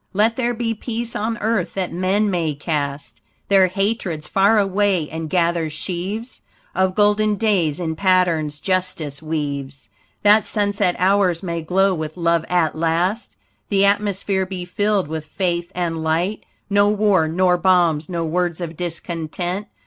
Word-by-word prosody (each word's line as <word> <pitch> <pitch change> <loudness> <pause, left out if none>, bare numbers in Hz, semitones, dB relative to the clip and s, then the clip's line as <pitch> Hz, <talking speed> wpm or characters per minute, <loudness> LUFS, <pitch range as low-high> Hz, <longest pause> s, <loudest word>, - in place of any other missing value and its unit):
Let 215 +4 +2
there 240 -1 -1
be 230 0 -1
peace 230 +1 -4
on 225 +2 -2
earth, 210 -4 -1
that 185 -3 -2
men 195 +4 +1
may 165 -5 -1
cast 145 -1 -4 0.3
Their 195 -2 +5
hatreds 190 -5 -2
far 200 +3 +3
away 195 -4 +1
and 160 0 -5
gather 170 -2 +1
sheaves 190 +9 -5 0.3
Of 190 0 +1
golden 210 0 +3
days 190 -9 +1
in 160 -2 -2
patterns 170 -5 +1
justice 180 -6 -2
weaves; 140 -4 -4 0.3
That 210 +1 +6
sunset 205 -3 +1
hours 185 -1 +2
may 170 -2 -3
glow 190 +4 +2
with 155 -1 -5
love 170 -1 +1
at 175 -4 +2
last, 170 +7 -1 0.3
The 200 -1 +3
atmosphere 200 -1 0
be 185 -2 -5
filled 205 0 0
with 155 0 -5
faith 175 +1 -2
and 165 -2 -2
light, 170 +6 -1 0.2
No 205 0 +3
war, 205 -5 +3
nor 180 +2 +2
bombs, 175 -4 +2
no 170 -2 -2
words 175 +1 -1
of 170 -2 -5
discontent. 175 +3 -4
180 Hz, 150 wpm, -20 LUFS, 165-205 Hz, 0.3 s, That